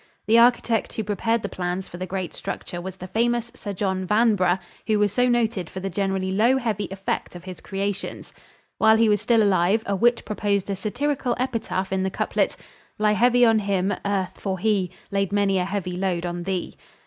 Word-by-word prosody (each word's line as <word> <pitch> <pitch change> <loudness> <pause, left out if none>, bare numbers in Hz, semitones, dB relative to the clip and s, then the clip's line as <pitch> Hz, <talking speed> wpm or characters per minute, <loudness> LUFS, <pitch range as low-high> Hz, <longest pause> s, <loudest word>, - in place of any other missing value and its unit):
The 225 +2 +5
architect 235 -1 +3
who 220 - -2
prepared 220 +3 0
the - - -1
plans 180 0 -3
for 175 - -9
the 185 +1 -5
great 185 -2 -4
structure 175 - -5
was 190 +1 -7
the 185 - -8
famous 235 +4 0
Sir 205 - -6
John 190 -1 -1
Vanbrugh, 210 -4 +3 0.3
who 215 -1 +3
was 205 -1 +2
so 250 0 +3
noted 225 -7 0
for 190 - -6
the 195 +1 -4
generally 190 -1 -1
low 230 +7 +3
heavy 220 -5 -1
effect 195 -1 -3
of 175 - -9
his 185 -2 -9
creations. 200 0 -4 0.5
While 220 0 +6
he 225 0 +4
was 205 -1 +2
still 225 -1 +3
alive 195 +2 +3
a 200 - 0
wit 235 +4 +3
proposed 200 -2 -1
a - - -1
satirical 245 +5 -1
epitaph 225 -7 -2
in 190 - +1
the 190 - 0
couplet, - - -1 0.4
"Lie 210 -1 +3
heavy 245 +3 +4
on 225 -1 +4
him, 195 -1 0
Earth, 195 -2 -2
for 190 -2 -2
he 195 -2 +1 0.2
Laid 195 -1 0
many 200 -2 +2
a 180 - 0
heavy 190 -2 -3
load 180 -2 -1
on 175 0 -3
thee." 190 -2 -3
200 Hz, 200 wpm, -24 LUFS, 190-225 Hz, 0.5 s, While